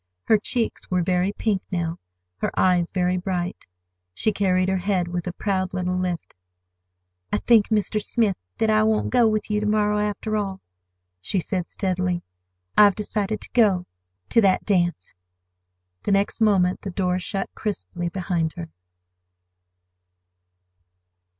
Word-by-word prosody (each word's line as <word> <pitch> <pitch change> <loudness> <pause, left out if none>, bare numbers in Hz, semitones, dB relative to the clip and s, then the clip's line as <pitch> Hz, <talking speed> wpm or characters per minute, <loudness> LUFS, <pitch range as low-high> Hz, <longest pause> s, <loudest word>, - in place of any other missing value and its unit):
Her 220 - +4
cheeks 230 +2 -2
were 180 -1 +1
very 180 +2 +1
pink 205 -2 -1
now, 170 -2 -2 0.4
her - - -1
eyes 180 -2 +3
very 180 -1 +1
bright. 180 0 -3 0.5
She 215 - +1
carried 185 -2 +1
her 190 0 +1
head 180 -2 0
with 175 0 -4
a - - -1
proud 185 0 -2
little 180 0 -1
lift. 180 -2 -3 1.0
"I - - +2
think, 225 -4 +4
Mr. 215 0 +1
Smith, 220 -5 +1 0.2
that 220 -1 +2
I 215 0 +4
won't 220 0 +1
go 245 -2 +5
with 215 -1 -1
you 210 - +2
to 210 - -1
morrow, 210 0 +2
after 210 +1 -2
all," 195 -2 -2 0.6
she 190 - 0
said 180 0 -2
steadily. 185 -2 -1 0.5
"I've 205 -3 +7
decided 210 0 -2
to - - -9
go—to 175 - +1
that 190 -3 +3
dance." 175 - 0 0.9
The - - -1
next 200 +3 0
moment 190 -4 +3
the 200 - -5
door 180 -1 0
shut 195 +2 -3
crisply 180 -4 -4
behind 170 -3 -1
her. 170 -2 -7
190 Hz, 145 wpm, -24 LUFS, 180-210 Hz, 1.0 s, I've